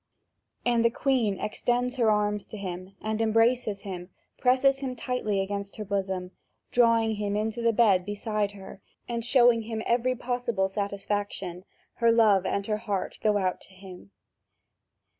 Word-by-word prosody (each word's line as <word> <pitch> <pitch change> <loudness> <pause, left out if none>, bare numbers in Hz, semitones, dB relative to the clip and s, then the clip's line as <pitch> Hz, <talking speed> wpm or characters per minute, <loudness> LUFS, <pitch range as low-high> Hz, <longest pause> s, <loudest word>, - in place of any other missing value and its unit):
And 240 -1 +3
the 235 - +5
Queen 235 -6 0
extends 245 +4 -1
her 230 -3 +3
arms 210 -1 0
to 215 - -8
him 185 0 -6
and, 220 +1 -1
embracing 225 0 +2
him, 185 -3 -8 0.3
presses 265 +2 +3
him 260 -2 -4
tightly 225 -5 -1
against 200 0 -4
her 215 - -6
bosom, 190 -2 -2 0.4
drawing 230 -2 +3
him 205 -1 -2
into 220 +2 -2
the 230 0 +3
bed 205 -5 +4
beside 205 +1 -2
her 195 -1 -11 0.3
and 235 -1 -3
showing 240 -1 +5
him 220 0 -4
every 250 +2 +1
possible 240 -5 -1
satisfaction; 200 -2 -3 0.3
her 235 0 +4
love 210 -5 +4
and 200 - -1
her 210 0 -1
heart 205 -4 -3
go 210 -1 +3
out 185 -2 -1
to 190 - -14
him. 185 - -12
215 Hz, 155 wpm, -27 LUFS, 200-235 Hz, 0.4 s, the